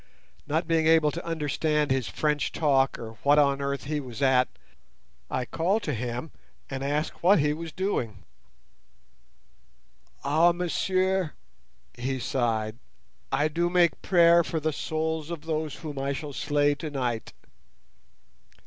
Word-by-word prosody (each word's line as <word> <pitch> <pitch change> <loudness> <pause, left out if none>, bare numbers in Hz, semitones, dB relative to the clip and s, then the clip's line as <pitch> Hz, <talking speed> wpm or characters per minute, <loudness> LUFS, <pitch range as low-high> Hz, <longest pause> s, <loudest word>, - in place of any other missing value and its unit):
Not 160 +3 0
being 165 -1 +2
able 160 -2 +5
to 170 - -6
understand 150 -2 0
his 130 -4 +1
French 150 +9 0
talk 135 -4 +2
or 115 -1 -7
what 145 +1 +4
on 140 -1 +3
earth 140 0 -2
he 150 +1 -2
was 125 -5 -8
at, 130 -1 +4 0.8
I 130 - -1
called 190 - 0
to 150 - -1
him 120 +5 -4 0.4
and 135 0 -3
asked 145 +2 0
him - - -22
what 190 +4 +6
he 150 0 +2
was 165 +1 -6
doing. 125 - -2 2.0
"Ah, 160 +5 +4
monsieur," 185 0 0 0.6
he 130 +2 -3
sighed, 115 -3 -1 0.5
"I 145 +3 +2
do 170 +3 0
make 175 -1 +3
prayer 170 -2 +5
for 160 - -2
the 155 0 -1
souls 160 +1 -2
of 170 -3 -5
those 155 -2 -3
whom 150 -4 -6
I 140 +1 -1
shall 145 +1 -6
slay 145 +1 +2
tonight." 135 -7 -3
150 Hz, 140 wpm, -27 LUFS, 135-165 Hz, 2.0 s, what